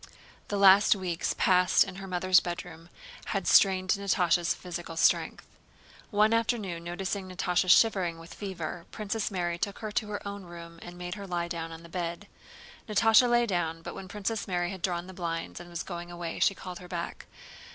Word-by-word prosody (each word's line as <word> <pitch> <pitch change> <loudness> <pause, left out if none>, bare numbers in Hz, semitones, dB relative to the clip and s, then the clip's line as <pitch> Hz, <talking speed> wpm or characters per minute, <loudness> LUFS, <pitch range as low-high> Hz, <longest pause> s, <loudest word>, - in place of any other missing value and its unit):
The 205 - -2
last 200 +1 +7
weeks 180 -4 -2
passed 180 -1 +4
in 190 -1 -8
her 195 0 -7
mother's 185 0 +4
bedroom 175 -1 -7 0.4
had 195 -3 -2
strained 185 -1 +5
Natásha's 180 -4 +2
physical 175 -2 -7
strength. - - +2 0.6
One 215 +1 +3
afternoon 220 -7 -1
noticing 185 +2 -4
Natásha 180 0 0
shivering 185 -5 +4
with 165 +1 -11
fever, 175 -4 -6
Princess 215 0 -3
Mary 175 -3 -2
took 200 +2 -2
her 215 -2 -5
to 210 - -1
her 205 -1 -5
own 200 0 -6
room 170 -1 -11
and 175 0 -10
made 180 0 -5
her 200 -2 -7
lie 175 -1 -2
down 165 -1 -5
on 165 0 -10
the - - -11
bed. 170 +2 -4 0.6
Natásha 225 +3 +5
lay 240 0 +4
down, 165 -5 -2
but - - -6
when 190 - -8
Princess 210 +2 -3
Mary 175 -2 -1
had 190 -2 -8
drawn 175 -1 -1
the 190 - -10
blinds 165 -2 -4
and 175 0 -11
was 170 -2 -4
going 175 -1 -7
away 175 -1 -5
she 195 - +3
called 180 -1 -8
her 180 - -11
back. 175 -1 -5
180 Hz, 185 wpm, -29 LUFS, 170-200 Hz, 0.6 s, last